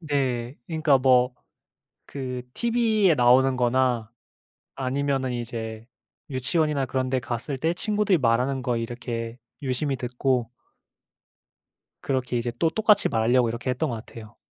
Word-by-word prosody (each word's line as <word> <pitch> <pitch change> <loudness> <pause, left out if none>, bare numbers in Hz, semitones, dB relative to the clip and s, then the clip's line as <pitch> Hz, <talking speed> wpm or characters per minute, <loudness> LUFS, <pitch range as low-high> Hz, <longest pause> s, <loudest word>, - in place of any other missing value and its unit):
네. 135 -5 -1
그러니까 155 -4 +3
뭐 125 -1 +4 0.7
그 130 -2 -5
TV에 225 -7 +2
나오는 130 +1 +5
거나 125 -2 +1 0.6
아니면은 135 0 -1
이제 115 -1 -5 0.4
유치원이나 140 +2 0
그런 130 0 -2
데 130 - +1
갔을 125 +3 -4
때 160 +5 0
친구들이 210 -1 +1
말하는 125 +2 +1
거 120 -1 -1
이렇게 115 0 -5 0.2
유심히 135 +2 -1
듣고 125 -1 -1 1.5
그렇게 130 -2 -1
이제 120 0 -2
또 165 - +2
똑같이 210 +2 +3
말하려고 120 +2 +2
이렇게 120 +3 -3
했던 130 +3 -1
것 115 - -3
같아요. 110 -1 -12
130 Hz, 290 characters per minute, -25 LUFS, 120-140 Hz, 1.5 s, 나오는